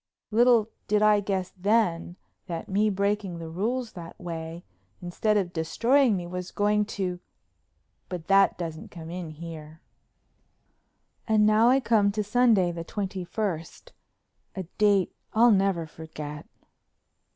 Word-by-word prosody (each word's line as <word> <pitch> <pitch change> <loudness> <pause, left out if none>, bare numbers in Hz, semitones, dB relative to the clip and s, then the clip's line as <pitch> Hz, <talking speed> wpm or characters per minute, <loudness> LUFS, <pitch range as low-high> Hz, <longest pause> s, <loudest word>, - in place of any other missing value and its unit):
Little 230 -1 +4 0.2
did 210 0 +2
I 210 -1 +5
guess 190 -2 -2
then 185 -3 +1 0.3
that 165 -3 -5
me 205 +2 +2
breaking 200 -2 -1
the 165 -1 -7
rules 230 +7 -2
that 170 -3 -10
way, 165 0 -6 0.3
instead 210 +4 0
of 180 -3 -1
destroying 230 - +2
me 175 - -5
was 180 +1 -5
going 210 0 +1
to——But 180 -2 -8
that 195 +1 +4
doesn't 165 -3 -6
come 165 -1 -9
in 175 -2 -5
here. 155 0 -9 1.5
And 215 -1 +4
now 215 +2 +5
I 265 +2 +5
come 215 -5 +3
to 210 0 -1
Sunday 210 -4 +3
the 170 -1 -6
twenty 190 +1 -4
first, 185 - -4 0.6
a 190 - -3 0.2
date 200 -3 +3 0.2
I'll 235 +2 +6
never 195 -4 +2
forget. 150 -2 -8
195 Hz, 130 wpm, -26 LUFS, 170-215 Hz, 1.5 s, I'll